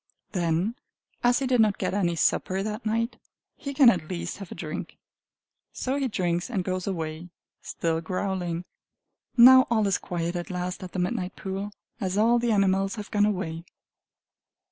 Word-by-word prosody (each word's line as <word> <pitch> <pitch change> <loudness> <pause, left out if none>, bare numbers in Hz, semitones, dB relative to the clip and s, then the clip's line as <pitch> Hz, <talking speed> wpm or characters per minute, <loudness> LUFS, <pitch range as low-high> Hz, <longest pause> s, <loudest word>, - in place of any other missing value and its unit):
Then, 175 - 0 0.5
as 245 0 +4
he 275 - -1
did 250 -2 +3
not 210 -2 +3
get - - -2
any 175 -4 +1
supper 190 +3 +1
that 215 +2 -4
night, 230 +2 -1 0.4
he 280 - -6
can 270 -3 +7
at 170 -6 -4
least 180 +1 -4
have 195 -3 -9
a - - -6
drink. - - -6 0.8
So 260 +1 -2
he 275 -2 0
drinks 175 -5 -1
and 200 -7 -1
goes 185 0 -3
away, 165 -2 -4 0.3
still 165 -1 -2
growling. 180 -1 -2 0.7
Now 260 +2 +9
all 220 -3 +2
is 195 -1 +1
quiet 170 0 -3
at 175 0 -4
last 180 0 -3
at 180 - -8
the - - -4
midnight 180 +1 -2
pool, 195 +2 -4 0.3
as 190 -3 -2
all 230 +3 +4
the 235 0 +1
animals 195 0 +2
have 210 -2 -8
gone 205 0 +3
away. 170 -5 -3
195 Hz, 170 wpm, -26 LUFS, 175-225 Hz, 0.8 s, Now